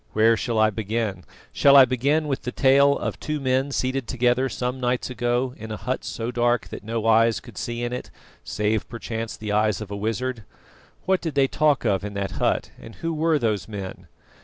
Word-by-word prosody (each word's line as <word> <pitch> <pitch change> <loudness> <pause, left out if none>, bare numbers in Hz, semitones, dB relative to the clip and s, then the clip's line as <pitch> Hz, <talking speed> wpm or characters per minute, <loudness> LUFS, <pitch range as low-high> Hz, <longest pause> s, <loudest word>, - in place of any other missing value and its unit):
Where 110 +1 +4
shall 115 0 -2
I 110 0 +4
begin? 110 -2 -3 0.3
Shall 140 -1 +5
I 135 - +10
begin 140 +5 +1
with 135 -2 -2
the 125 - -4
tale 140 +2 +4
of - - -4
two 150 -1 -3
men 130 0 +1
seated 130 -2 -1
together 125 +1 +1
some 125 +1 -3
nights 125 0 -1
ago 125 +1 0
in 110 +1 -8
a 110 - -4
hut 130 +4 -3
so 115 +1 -4
dark 120 -1 +1
that - - -8
no 115 +1 -3
eyes 115 0 +4
could 120 -4 -14
see 120 +4 -4
in 120 0 -2
it, 125 - -5 0.3
save 105 0 -1
perchance 115 -1 -5
the 105 -1 -5
eyes 105 -1 +2
of 105 -2 -7
a - - -3
wizard? 115 +3 -3 0.6
What 190 0 +2
did 160 -4 -4
they 135 -1 +4
talk 150 0 +1
of 95 -1 +1
in 100 0 -6
that 100 -1 -2
hut, - - 0
and 115 - -11
who 165 0 -3
were 160 0 +2
those 110 -7 -1
men? 100 -3 -7
120 Hz, 210 wpm, -24 LUFS, 110-130 Hz, 0.6 s, I